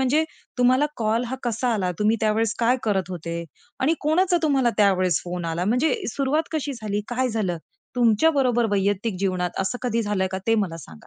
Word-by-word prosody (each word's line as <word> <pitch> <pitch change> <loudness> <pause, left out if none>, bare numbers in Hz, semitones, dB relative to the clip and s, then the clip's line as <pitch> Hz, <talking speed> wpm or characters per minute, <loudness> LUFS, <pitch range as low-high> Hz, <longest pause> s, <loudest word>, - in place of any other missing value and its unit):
म्हणजे 280 +5 +2 0.3
तुम्हाला 255 +4 +4
कॉल 225 +1 0
हा 260 - -3
कसा 240 +1 0
आला. 185 -4 0
तुम्ही 215 +2 +3
त्यावेळेस 220 0 +1
काय 245 +2 +3
करत 190 -4 0
होते? 170 -1 -5 0.4
आणि 295 +5 +3
कोणाचा 350 +4 +2
तुम्हाला 270 -6 +3
त्यावेळेस 185 -3 +3
फोन 175 0 -4
आला? 175 +2 -1
म्हणजे 250 +7 +2 0.2
सुरुवात 285 +4 0
कशी 295 -2 -2
झाली? 210 -1 -2
काय 250 +1 0
झालं? 205 -7 -1 0.4
तुमच्या 240 +5 +4
बरोबर 240 -3 +2
वैयक्तिक 200 +1 0
जीवनात 180 -2 -1
असं 195 +6 -2
कधी 230 -2 0
झालं 205 -3 -1
आहे 190 - -1
का 190 - -1
ते 225 - +4
मला 165 -3 -7
सांगा? 75 -1 -14
225 Hz, 190 wpm, -24 LUFS, 190-255 Hz, 0.4 s, तुम्हाला